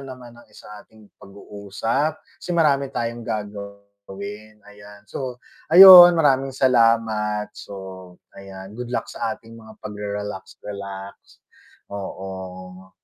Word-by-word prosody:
naman 130 -3 -11 0.2
sa 105 0 -13
ating 110 -1 -21
pag-uusap, 100 +9 -4 0.2
kasi - - -9
marami 140 -4 +2
tayong 120 -3 -4
gagawin 100 0 -9
ayan, 105 0 -16
so, 125 +3 -7 0.3
ayun 175 0 +10
maraming 135 -4 +2
salamat, 115 -4 +1
so, 95 -2 -11 0.2
ayan 95 0 -12
good 120 +2 -8
luck 120 -2 -3
sa 130 - -4
ating 115 -2 -18
mga 110 -1 -15
pag-rerelax-relax, 100 -1 -7 0.8
oo. 95 -1 -9
105 Hz, 100 wpm, -21 LUFS, 100-120 Hz, 0.8 s, ayun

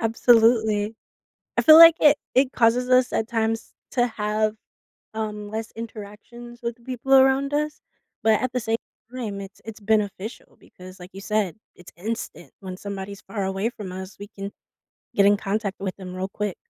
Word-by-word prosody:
Absolutely. 225 -2 +3 0.6
I - - +4
feel 310 0 +9
like 330 0 +10
it 295 -1 +6 0.2
it 260 0 +3
causes 245 +1 +2
us 255 0 +3
at 220 - 0
times 225 -1 -2 0.2
to 245 -1 +2
have, 215 -1 -1 0.6
um, 210 -1 -5
less 220 +1 -5
interactions 230 +2 -10
with 235 0 -3
the 235 - -27
people 260 +1 -2
around 270 +1 +4
us. 300 +1 -2 0.4
But 220 -1 +3
at 255 0 -1
the 250 - 0
same 225 0 -1 0.4
time, 215 -6 -5
it's 195 0 -12
it's 225 -1 -9
beneficial 210 0 -2
because, 185 +1 -14
like 180 +1 -11
you 195 - -9
said, 210 -3 -1 0.2
it's 175 - -15
instant. 220 +6 -6
When 185 -1 -7
somebody's 200 +1 -7
far 200 -3 -4
away 195 +3 -1
from 205 -6 -8
us, 190 +2 -8
we 205 - -8
can 200 -1 -8 0.6
get 200 - +4
in 205 +1 +5
contact 200 0 -3
with 195 -1 -4
them 185 -2 -9
real 185 +1 -3
quick. 205 -1 -4
220 Hz, 175 wpm, -24 LUFS, 200-240 Hz, 0.6 s, like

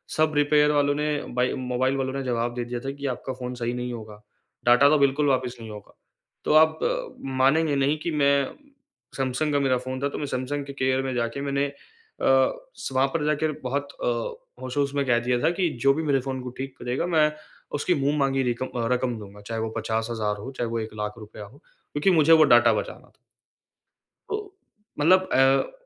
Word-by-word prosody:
सब 155 0 +3
रिपेयर 150 0 +4
वालों 145 -1 +2
ने, 150 0 -1
बाई 125 +1 0
मोबाइल 130 +1 -1
वालों 130 -1 -2
ने 135 0 -3
जवाब 120 -1 -1
दे 120 - -2
दिया 120 0 -4
था 135 - -2
कि 140 0 -8
आपका 130 +1 -6
फ़ोन 125 -1 -6
सही 120 0 -2
नहीं 125 0 -4
होगा। 110 -2 -9 0.4
डाटा 120 +4 +6
तो 155 - +4
बिल्कुल 140 +1 +2
वापस 130 -2 0
नहीं 115 -1 -9
होगा। 105 -1 -12 0.5
तो - - +2
आप 160 0 +5 0.6
मानेंगे 145 +3 +3
नहीं 140 +2 +2
कि 170 - -1
मैं 140 -2 +3 0.8
सैमसंग 135 +3 -1
का 145 - +3
मेरा 135 -2 +2
फ़ोन 130 +1 -5
था 140 - +1
तो - - -6
मैं 150 - -3
सैमसंग 135 +2 -3
के 140 - -8
केयर 130 -1 +1
में 135 -1 -2
जाके 120 +3 -2
मैंने 140 0 0
अ, 140 - -10 1.0
स - - -5
वहाँ 130 +1 +3
पर 155 -3 0
जाकर 150 +1 +1
बहुत 140 +3 -2
अ, - - 0 0.5
होश-होश 140 +2 -1
में 140 -1 +1
कह 120 -2 +3
दिया 125 -1 +2
था - - +4
की 180 -3 +2
जो 135 +2 +4
भी 160 +3 -2
मेरे 140 -3 +2
फ़ोन 130 0 -4
को 125 - -5
ठीक 135 0 -6
करेगा 125 +7 -2
मैं 155 -3 +3 0.5
उसकी 180 - +1
मुँह-माँगी 140 -2 +1
रिकम 125 0 -1
अ, 120 -3 -3
रकम 125 -1 -1
दूँगा। 105 0 -11
चाहे 110 +2 -4
वो 110 - -2
50000 110 -2 -2
हो, 115 +6 -7
चाहे 120 -3 -3
वो 115 0 -2
₹100000 105 -1 -6
हो। 110 +8 -16
क्योंकि 150 +5 -2
मुझे 165 -2 +5
वो 160 -1 +7
डाटा 120 -5 +6
बचाना 105 - -5
था। - - -29 1.1
तो 415 -2 -4 0.5
मतलब 185 +5 +4
अ, 135 - +4
135 Hz, 200 wpm, -25 LUFS, 120-145 Hz, 1.1 s, वो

